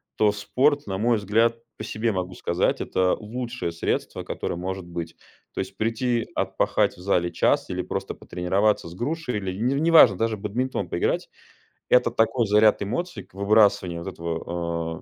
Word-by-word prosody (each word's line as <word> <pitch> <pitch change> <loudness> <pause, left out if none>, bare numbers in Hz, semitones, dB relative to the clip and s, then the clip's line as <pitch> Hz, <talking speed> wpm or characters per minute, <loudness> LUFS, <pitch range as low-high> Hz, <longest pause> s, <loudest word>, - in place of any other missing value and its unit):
то 105 -1 +3
спорт, 130 +7 +1
на 95 -1 -2
мой 115 +2 +2
взгляд, 115 +3 +2 0.2
по - - -6
себе 110 +1 -1
могу 90 -1 -3
сказать, 85 0 0
это 90 -1 +1
лучшее 120 -3 -4
средство, 85 - -2
которое - - -4
может 95 +1 -4
быть. 85 -1 -6 0.4
То - - -6
есть 95 +1 -8
прийти 115 +1 0
отпахать - - 0
в - - -15
зале 90 -2 +1
час - - +1
или - - -2
просто - - -4
потренироваться 95 +2 0
с 85 - -11
грушей, 130 - -2
или 95 -2 -3
н 135 +5 +1
неважно, 160 - +7
даже 115 -1 0
бадминтон 105 -1 -2
поиграть- 85 - -1 0.6
это 125 -2 +4
такой 115 0 +1
заряд 105 +1 +4
эмоций 175 - -3
к - - -28
выбрасыванию 100 -4 +3
вот 95 - -5
этого, 85 0 -4
105 Hz, 165 wpm, -24 LUFS, 90-115 Hz, 0.6 s, неважно